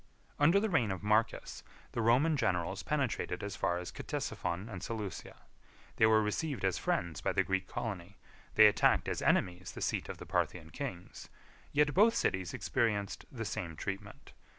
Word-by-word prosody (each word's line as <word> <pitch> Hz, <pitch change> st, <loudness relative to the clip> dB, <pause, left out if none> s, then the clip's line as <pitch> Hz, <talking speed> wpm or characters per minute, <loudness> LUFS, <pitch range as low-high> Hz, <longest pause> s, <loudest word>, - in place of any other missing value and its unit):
41 145 Hz, -, +5 dB
Under 185 Hz, +5 st, +5 dB
the 220 Hz, +2 st, 0 dB
reign 125 Hz, -, +2 dB
of 95 Hz, 0 st, -4 dB
Marcus, 110 Hz, +2 st, +1 dB, 0.3 s
the 115 Hz, -, -2 dB
Roman 130 Hz, +8 st, +4 dB
generals 95 Hz, -, 0 dB
penetrated 140 Hz, -9 st, -1 dB
as 100 Hz, -1 st, -4 dB
far 90 Hz, -2 st, 0 dB
as 90 Hz, 0 st, -5 dB
Ctesiphon 85 Hz, +5 st, -3 dB
and 95 Hz, -6 st, -7 dB
Seleucia. 105 Hz, -2 st, -6 dB, 0.5 s
They 110 Hz, -, +6 dB
were 110 Hz, 0 st, +5 dB
received 115 Hz, +1 st, -2 dB
as 95 Hz, -, +1 dB
friends 85 Hz, -3 st, -1 dB
by -, -, 0 dB
the -, -, +3 dB
Greek 95 Hz, -1 st, -1 dB
colony; 100 Hz, -5 st, -5 dB, 0.4 s
they -, -, +9 dB
attacked -, -, +4 dB
as -, -, -2 dB
enemies 90 Hz, 0 st, +1 dB
the -, -, -8 dB
seat -, -, -1 dB
of -, -, -5 dB
the -, -, -9 dB
Parthian 80 Hz, -3 st, -1 dB
kings; 95 Hz, -, -7 dB, 0.4 s
yet 145 Hz, 0 st, +3 dB
both 225 Hz, +4 st, +5 dB
cities 95 Hz, -, 0 dB
experienced 110 Hz, -5 st, -1 dB
the 115 Hz, -4 st, -5 dB
same 85 Hz, -5 st, -4 dB
treatment. 100 Hz, +4 st, -6 dB
105 Hz, 175 wpm, -33 LUFS, 95-125 Hz, 0.5 s, they